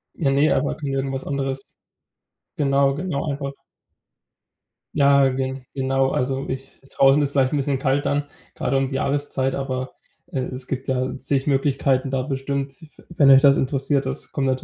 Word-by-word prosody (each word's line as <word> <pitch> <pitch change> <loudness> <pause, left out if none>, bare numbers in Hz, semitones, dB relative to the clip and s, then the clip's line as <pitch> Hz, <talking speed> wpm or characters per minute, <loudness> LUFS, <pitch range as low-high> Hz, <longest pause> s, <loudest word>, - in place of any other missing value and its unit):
Ja 140 -5 +1
ne, 145 +3 +3
aber 145 - 0
g 145 -2 -5
irgendwas 135 0 -2
anderes. 135 -1 -2 0.9
Genau, 140 -1 +3
genau, 165 -3 -3
einfach 140 0 -4 1.4
Ja, 140 -1 +5
ge 130 0 -3
genau, 135 0 +1
also 135 +2 -1
ich 130 +1 -6 0.2
draußen 135 +2 +5
ist 140 -1 0
vielleicht 135 0 +2
'n - - +2
bisschen 140 -1 0
kalt 135 +1 0
dann, 145 0 +1 0.3
gerade 135 - -1
um 135 0 +1
die 135 - -4
Jahreszeit, 135 -1 -1
aber, 130 -1 -3 0.4
äh, 135 - -2
es 130 0 -7
gibt 135 0 -4
ja 130 0 -1
zig 135 0 -1
Möglichkeiten 135 -1 +1
da 130 -1 -1
bestimmt, 135 0 -3 0.2
w - - -17
wenn 145 -5 +4
euch 135 0 +8
das 140 -1 +6
interessiert, 135 0 0
das 135 +2 -6
kommt 130 -2 -1
135 Hz, 170 wpm, -22 LUFS, 135-140 Hz, 1.4 s, euch